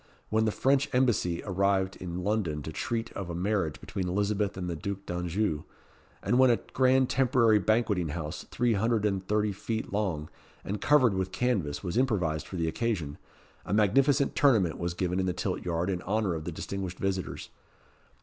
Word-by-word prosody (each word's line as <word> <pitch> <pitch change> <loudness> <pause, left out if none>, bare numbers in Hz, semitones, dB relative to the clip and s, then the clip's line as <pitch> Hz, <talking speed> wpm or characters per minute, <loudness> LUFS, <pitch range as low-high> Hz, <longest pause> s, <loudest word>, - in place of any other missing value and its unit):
When 110 +1 +2
the 110 - +2
French 135 +5 +2
Embassy 115 -9 +1
arrived 95 -1 +1
in 90 0 -5
London 90 -9 -1
to 80 - -5
treat 115 +7 -3
of 95 -3 -6
a 85 - -4
marriage 90 -4 -1
between 95 -2 -4
Elizabeth 100 +1 0
and 90 -1 -3
the 85 - -2
Duc 100 +4 -5
d'Anjou, 90 -1 -1 0.6
and 120 - +2
when 130 -1 +7
a 120 - +4 0.2
grand 130 0 +4
temporary 125 -5 +3
banqueting 105 -5 +1
house, 75 0 -5
three 120 -1 +1
hundred 110 +1 +1
and 95 -2 0
thirty 105 0 +1
feet 110 +2 -4
long, 90 -8 -1 0.4
and 100 +1 -4
covered 130 -7 +4
with 95 -1 -2
canvas, 100 -13 -1
was 90 +4 0
improvised 90 - 0
for - - -7
the 85 -2 0
occasion, 80 -5 -2 0.4
a - - -1
magnificent 135 +7 +3
tournament 110 - +3
was 85 0 -2
given 90 0 -1
in 95 - 0
the 90 - 0
tilt - - -3
yard 85 0 -1
in 90 -2 -1
honour 105 -1 0
of 80 -1 -5
the 85 - -3
distinguished 90 +3 -5
visitors. 95 -1 -3
100 Hz, 180 wpm, -29 LUFS, 90-110 Hz, 0.6 s, when